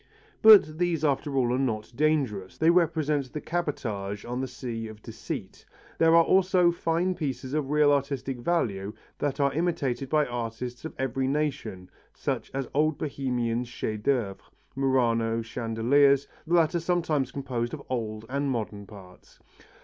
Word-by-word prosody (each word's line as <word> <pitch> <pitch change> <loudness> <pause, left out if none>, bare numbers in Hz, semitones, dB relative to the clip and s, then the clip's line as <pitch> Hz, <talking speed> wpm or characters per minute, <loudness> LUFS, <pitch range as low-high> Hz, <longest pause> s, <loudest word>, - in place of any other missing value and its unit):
But 195 -8 +7
these 170 -3 +1
after 140 0 0
all 125 -2 +2
are 125 - 0
not 110 -4 -2
dangerous, 135 -10 0
they 160 +1 +4
represent 155 -6 +1
the 150 - -4
cabotage 110 - -3
on 125 +2 -3
the 130 - -2
sea 115 -4 -5
of 110 -1 -12
deceit; - - -7 0.4
there 165 0 +5
are 165 - +7
also 185 -1 +4
fine 170 +2 0
pieces 135 -6 -4
of 150 -3 -1
real 150 0 +4
artistic 135 -2 -1
value 105 - -1 0.3
that 145 0 -2
are 140 -1 +2
imitated 140 -6 -1
by 155 -1 +3
artists 120 +1 -5
of 160 - -6
every 130 0 -1
nation 140 -10 -2 0.3
such - - -3
as 135 -1 -3
old 155 +1 +2
Bohemian 125 -5 -1
chefs 110 -3 -4
d'œuvre, 115 -6 0 0.4
Murano 115 -4 +1
chandeliers, 125 +5 +2 0.2
the 170 - +2
latter 170 +1 +3
sometimes 160 -6 0
composed 125 -4 -3
of 140 - -11
old 110 -3 -3
and 140 +2 -1
modern 105 -5 -4
parts. 95 -4 -15
135 Hz, 150 wpm, -27 LUFS, 115-155 Hz, 0.4 s, But